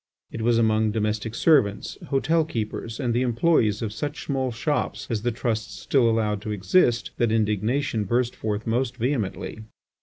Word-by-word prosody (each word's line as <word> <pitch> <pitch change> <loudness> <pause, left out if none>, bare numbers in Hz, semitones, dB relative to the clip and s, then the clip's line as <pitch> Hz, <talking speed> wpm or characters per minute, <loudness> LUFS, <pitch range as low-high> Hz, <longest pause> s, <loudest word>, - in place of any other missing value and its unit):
It 115 - -5
was 115 +1 +3
among 110 -1 +3
domestic 110 +1 -2
servants, 130 -12 +2
hotel 160 +4 +2
keepers, 115 -4 -4
and 120 -3 0
the 120 - +1
employees 120 -4 +2
of 105 -2 -3
such 145 +5 -4
small 130 -3 -1
shops 145 +6 -2
as 110 -2 -1
the 120 +2 0
Trusts 110 -3 -3
still 125 -4 +2
allowed 105 -2 0
to 105 - -4
exist, 115 - +2
that 120 -2 +2
indignation 110 +2 0
burst 120 +4 0
forth 105 0 -3
most 120 +2 -1
vehemently. 115 -4 -2
115 Hz, 160 wpm, -25 LUFS, 110-130 Hz, -, was